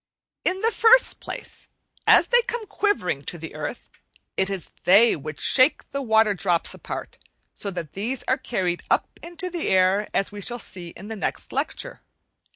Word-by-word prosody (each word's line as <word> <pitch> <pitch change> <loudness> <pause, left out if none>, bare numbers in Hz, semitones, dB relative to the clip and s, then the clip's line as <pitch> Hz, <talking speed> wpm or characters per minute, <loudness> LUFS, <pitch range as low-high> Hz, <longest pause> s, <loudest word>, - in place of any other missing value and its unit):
In 375 +1 0
the 455 - +2
first 480 +3 +5
place, - - -8 0.4
as - - +6
they 485 0 +5
come 475 -2 -3
quivering 410 - 0
to 175 - -5
the 165 0 -8
earth, 155 +9 -6 0.5
it 190 0 +2
is 195 -4 -4
they 210 +6 +6
which 155 0 -7
shake 260 +3 +3
the 280 - -2
water 220 -4 +4
drops 175 -3 0
apart, - - -7 0.3
so 200 - -4
that 170 -6 -6
these 235 +7 -2
are 260 - 0
carried 185 -9 -2
up - - 0
in 345 +1 -10
the 355 -1 -3
air, 190 +2 +3
as 195 - 0
we 205 0 -8
shall 240 +5 -1
see 185 -6 -7
in 190 +4 -11
the 225 - -4
next 205 - -3
lecture. - - -3
210 Hz, 175 wpm, -24 LUFS, -, 0.5 s, as